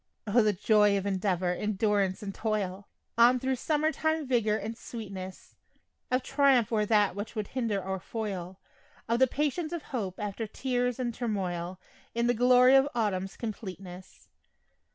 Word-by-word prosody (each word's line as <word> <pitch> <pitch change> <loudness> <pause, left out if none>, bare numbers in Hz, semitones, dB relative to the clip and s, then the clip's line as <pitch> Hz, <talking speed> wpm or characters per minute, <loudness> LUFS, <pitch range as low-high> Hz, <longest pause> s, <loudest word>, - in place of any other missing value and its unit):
O, 225 +3 +4
the 215 -1 +3
joy 210 +1 +3
of 195 - -3
endeavor, 185 -2 0
endurance 205 0 0
and 195 -1 -5
toil 205 -3 -2 0.3
On 245 +2 +6
thro' 265 +1 0
summer 305 +4 0
time 315 -1 -1
vigor 230 -5 +1
and 225 +1 -5
sweetness, 195 -6 -8 0.6
Of 255 0 +1
triumph 270 -5 +3
o'er 210 -2 +1
that 205 -4 +3
which 205 +3 -6
would 210 -2 -3
hinder 230 -6 -1
or 190 0 -4
foil, 190 -3 -5 0.5
Of 230 +1 +1
the 260 - +6
patience 300 +5 -1
of 340 -3 -4
hope 195 -7 -3
after 210 +1 -4
tears 245 +1 -1
and 245 -2 -2
turmoil, 185 -6 -3 0.4
In 235 0 +1
the 245 - +3
glory 250 +2 +5
of 270 +1 +5
autumn's 195 -4 -1
completeness. 190 -5 -8
215 Hz, 155 wpm, -29 LUFS, 195-250 Hz, 0.6 s, On